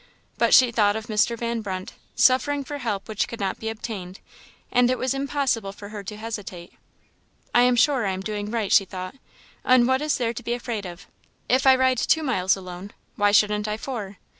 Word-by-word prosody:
But - - +5
she 250 -2 +6
thought 210 -3 +2
of 220 0 -4
Mr. 225 +1 +1
Van 235 0 -2
Brunt, 190 -3 -5 0.2
suffering 280 +2 +3
for 290 +2 -6
help 210 -6 -3
which 215 -2 -1
could 230 - -8
not 195 -2 -2
be 220 - -3
obtained, 205 -4 -7 0.5
and 245 0 +4
it 255 - +1
was 255 +1 -1
impossible 270 -7 -1
for 200 0 -11
her 210 -1 -7
to 210 +2 -7
hesitate. 205 -6 -7 0.8
"I 240 - +5
am 250 0 +4
sure 245 -2 +3
I - - 0
am 190 0 -4
doing 210 0 -4
right," 220 -3 -2
she 195 - +5
thought; 185 0 -7 0.5
"and 250 -1 +5
what 260 +1 +2
is 300 0 0
there 235 -2 -1
to 240 - -7
be 240 0 -2
afraid 235 -5 -4
of? 175 +2 -10 0.4
If 260 +2 +2
I 265 - +8
ride 260 -1 +2
two 320 - +2
miles 190 -9 +1
alone, 185 +1 -9 0.2
why 205 0 +3
shouldn't 210 0 +3
I 210 0 -2
four? 215 -6 -6
220 Hz, 210 wpm, -24 LUFS, 200-250 Hz, 0.8 s, I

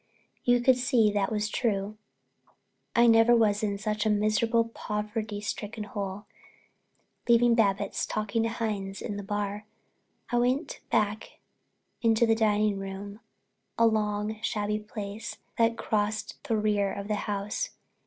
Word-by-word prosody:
You 245 0 +4
could 255 +1 +5
see 235 -4 +3
that 205 -1 0
was 210 -1 0
true. 210 -3 -1 1.0
I 235 - +6
never 225 +1 +6
was 215 -3 +3
in 205 -2 -1
such 210 +1 -1
a 220 - +1
miserable, 215 +2 +2
poverty 210 -1 -4
stricken 210 +1 -4
hole. 205 -1 -5 1.0
Leaving 235 0 +6
Babbitts 205 -4 +1
talking 215 +1 -1
to 225 - +1
Hines 210 -4 -3
in 210 - -4
the 205 - -4
bar, 205 +1 -3 0.6
I 240 - +3
went 255 +6 0
back 210 +1 0 0.6
into 225 0 +4
the 225 - +4
dining 210 -2 +2
room, 195 +2 -7 0.6
a 230 - +5
long, 215 -1 0
shabby 210 -1 -1
place 210 0 -6 0.2
that 230 0 +3
crossed 215 0 -2
the 225 - +1
rear 210 -2 +1
of 200 0 -5
the 210 - 0 0.2
house. 205 - -2
215 Hz, 140 wpm, -28 LUFS, 205-225 Hz, 1.0 s, I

